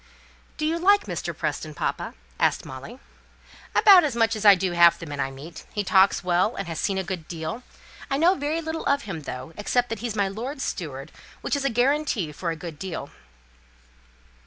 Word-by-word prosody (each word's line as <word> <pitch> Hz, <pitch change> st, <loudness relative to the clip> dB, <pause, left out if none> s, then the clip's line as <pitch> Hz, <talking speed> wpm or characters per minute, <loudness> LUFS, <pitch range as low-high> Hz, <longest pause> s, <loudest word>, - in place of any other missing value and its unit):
"Do 305 Hz, -, -1 dB
you 330 Hz, +2 st, 0 dB
like 405 Hz, +3 st, +5 dB
Mr. -, -, -5 dB
Preston, 155 Hz, -1 st, -3 dB
papa?" -, -, -3 dB, 0.2 s
asked -, -, +1 dB
Molly. 135 Hz, -, -9 dB, 0.8 s
"About 385 Hz, -4 st, +8 dB
as 285 Hz, -6 st, -1 dB
much 225 Hz, -1 st, +2 dB
as 215 Hz, 0 st, -5 dB
I 200 Hz, -1 st, +10 dB
do 185 Hz, -1 st, -1 dB
half 170 Hz, -1 st, +6 dB
the -, -, -8 dB
men 145 Hz, -2 st, -6 dB
I 135 Hz, -, 0 dB
meet. 140 Hz, +5 st, -10 dB
He 205 Hz, -, -1 dB
talks 190 Hz, -1 st, +4 dB
well, 180 Hz, +5 st, +1 dB
and 195 Hz, -, -4 dB
has 165 Hz, -2 st, -4 dB
seen 195 Hz, -2 st, 0 dB
a 190 Hz, -, -1 dB
good 175 Hz, -3 st, -5 dB
deal. 165 Hz, +7 st, -5 dB, 0.5 s
I 275 Hz, -, 0 dB
know 340 Hz, +5 st, +5 dB
very 305 Hz, 0 st, -2 dB
little 320 Hz, 0 st, -4 dB
of 280 Hz, 0 st, +2 dB
him, 170 Hz, -6 st, -6 dB
though, 130 Hz, +2 st, -7 dB
except 245 Hz, +4 st, 0 dB
that 225 Hz, -2 st, -4 dB
he's 230 Hz, -2 st, -4 dB
my 200 Hz, -2 st, +1 dB
lord's 250 Hz, +8 st, -5 dB
steward, 140 Hz, -6 st, -5 dB, 0.3 s
which -, -, -1 dB
is 280 Hz, -1 st, -2 dB
a -, -, +3 dB
guarantee 245 Hz, -, +1 dB
for 170 Hz, +3 st, -4 dB
a 165 Hz, -, -2 dB
good 160 Hz, -2 st, -8 dB
deal." 170 Hz, -6 st, -5 dB
200 Hz, 205 wpm, -25 LUFS, 165-275 Hz, 0.8 s, I